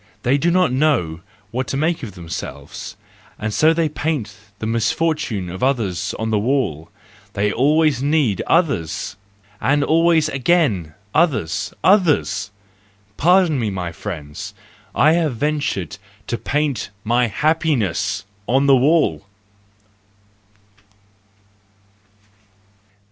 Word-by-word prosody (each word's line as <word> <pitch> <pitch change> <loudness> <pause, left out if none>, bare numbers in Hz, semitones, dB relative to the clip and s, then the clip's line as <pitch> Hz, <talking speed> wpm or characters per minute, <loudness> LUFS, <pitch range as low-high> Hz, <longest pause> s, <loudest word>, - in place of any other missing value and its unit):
They 135 +3 +2
do 170 - +2
not 180 -5 +3
know 125 - +1 0.3
what 125 +2 -2
to 135 - -2
make 160 +3 0
of 110 -8 -7
themselves—and 85 +5 -8
so 155 +7 +4
they 165 -1 +1
paint 145 -9 -3 0.2
the 110 - -5
misfortune 115 - 0
of 90 +2 -7
others 115 -10 0
on 110 0 -2
the 105 - +2
wall; 105 - -1 0.4
they 105 +1 0
always 150 +1 +2
need 140 - +1
others! 140 - 0 0.5
And 145 +5 +2
always 165 0 +3
again 130 - +1 0.2
other 160 - +3 0.4
others 170 - +3 0.7
!—Pardon 175 - +3
me, 110 -3 0
my 90 -3 -4
friends, 85 +6 -7 0.4
I 155 - +5
have 160 -6 +1
ventured 145 - -2 0.3
to - - -2
paint 145 -4 -1
my 120 +2 +2
happiness 120 - 0 0.2
on 135 +3 +3
the 140 -1 +6
wall. 135 - +3
130 Hz, 110 wpm, -20 LUFS, 100-155 Hz, 0.7 s, the